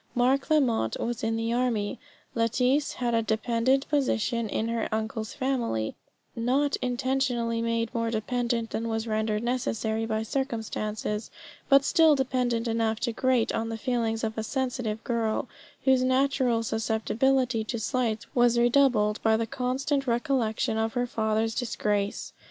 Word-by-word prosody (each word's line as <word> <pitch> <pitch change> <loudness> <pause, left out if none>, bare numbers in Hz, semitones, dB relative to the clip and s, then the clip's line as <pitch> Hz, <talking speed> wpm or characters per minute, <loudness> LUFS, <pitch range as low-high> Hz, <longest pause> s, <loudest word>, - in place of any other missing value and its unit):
Mark 260 +4 +2
Lamotte 250 - +2
was 240 -1 -3
in 225 0 0
the 225 +1 -1
army; 240 -2 0 0.3
Lettice 250 +5 +1
had 240 -1 -1
a 230 - +3
dependent 230 +5 +1
position 235 -5 0
in 220 - -1
her 230 -1 -1
uncle's 220 0 -3
family; 240 - -1 0.4
not 265 +5 +1
intentionally 245 -2 0
made 230 0 -1
more 230 -1 0
dependent 235 +1 -1
than 230 - -2
was 225 0 -2
rendered 215 -1 -1
necessary 225 -2 -1
by 220 0 -1
circumstances, 220 -3 -3 0.4
but 275 0 +6
still 320 -3 +5
dependent 250 -3 0
enough 225 -1 0
to 235 -2 -1
grate 255 -1 +1
on 225 0 -1
the 225 - -4
feelings 225 -1 -1
of 220 0 -2
a - - -2
sensitive 245 -3 -2
girl, 230 -3 -1 0.4
whose 265 -1 +4
natural 260 -2 +2
susceptibilty 230 +2 +1
to 235 - -2
slights 225 -1 -1
was 240 -1 +4
redoubled 240 -4 +3
by 220 0 +3
the 230 - -1
constant 275 +3 -1
recollection 235 -2 0
of 225 0 -1
her 245 -1 0
father's 220 -1 0
disgrace. 210 -4 -2
230 Hz, 145 wpm, -27 LUFS, 220-255 Hz, 0.4 s, but